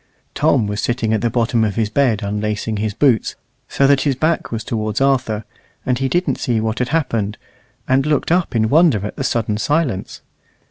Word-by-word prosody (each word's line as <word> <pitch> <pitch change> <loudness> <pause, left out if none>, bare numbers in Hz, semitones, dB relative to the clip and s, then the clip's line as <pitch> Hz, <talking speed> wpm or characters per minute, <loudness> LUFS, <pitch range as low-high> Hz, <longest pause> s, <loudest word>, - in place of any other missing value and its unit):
Tom 110 - +2
was 105 +1 -3
sitting 120 -2 -1
at 110 - 0
the 120 - +1
bottom 115 -1 +1
of 105 -3 -1
his 110 -2 -1
bed 115 -5 +1
unlacing 105 +1 -2
his 105 -1 -2
boots, 130 -7 +2 0.3
so 140 - +1
that 140 -1 +4
his 140 -3 +1
back 160 +5 -1
was 115 -2 -3
towards 110 -2 -2
Arthur, 125 -6 +1 0.4
and 125 -1 0
he 135 0 0
didn't 175 +7 0
see 120 -5 0
what 110 0 -2
had 125 - -1
happened, 115 -10 -1 0.5
and 135 +2 +2
looked 150 +1 0
up 175 -6 +1
in 110 -1 +2
wonder 140 - +3
at 105 - -6
the - - -4
sudden 110 -4 -1
silence. 145 - -1
115 Hz, 195 wpm, -19 LUFS, 110-135 Hz, 0.5 s, that